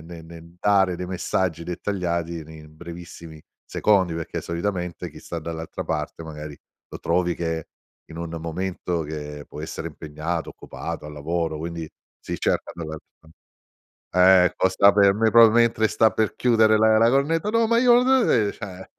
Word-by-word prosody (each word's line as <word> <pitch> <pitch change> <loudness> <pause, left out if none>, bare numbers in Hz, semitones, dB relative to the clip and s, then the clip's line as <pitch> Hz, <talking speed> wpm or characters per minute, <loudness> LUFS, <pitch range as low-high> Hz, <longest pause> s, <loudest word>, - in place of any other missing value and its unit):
ne 85 0 -10
nel 85 +1 -13
dare 95 -2 +3
dei 90 0 -5
messaggi 90 -2 -2
dettagliati 85 -2 -3
nei 80 0 -12
brevissimi 85 0 -11 0.2
secondi, 95 -5 +2
perché 80 -1 -4
solitamente 90 0 -4
chi - - -12
sta 85 - -6
dall'altra 80 0 -6
parte 80 - -4
magari 75 -2 -8 0.3
lo - - -8
trovi 90 0 0
che 80 -2 -3 0.4
in 80 - -12
un 85 0 -5
momento 85 0 -3
che 75 -1 -7
può 75 - -9
essere 80 - -6
impegnato, 80 +2 -5
occupato, 75 - -7
al 75 - -9
lavoro, 80 +2 -2
quindi 85 0 -5 0.3
si - - -5
cerca - - -1
dall'altra 80 -1 -10 1.2
Eh 90 - 0
costa 95 +2 +4
per 100 -1 +5
me, 110 +1 +2
proprio 115 -1 +8
mentre 115 -1 +3
sta 110 +1 +3
per 110 -1 -1
chiudere 110 -3 +4
la 110 0 +4
la 115 +1 +5
cornetta: 150 +7 +1
"no, 230 0 +2
ma 230 +1 +3
io 245 0 +5
no" 260 -1 +3
e 105 -4 +2
cioè. 95 -3 -9
85 Hz, 160 wpm, -23 LUFS, 80-105 Hz, 1.2 s, proprio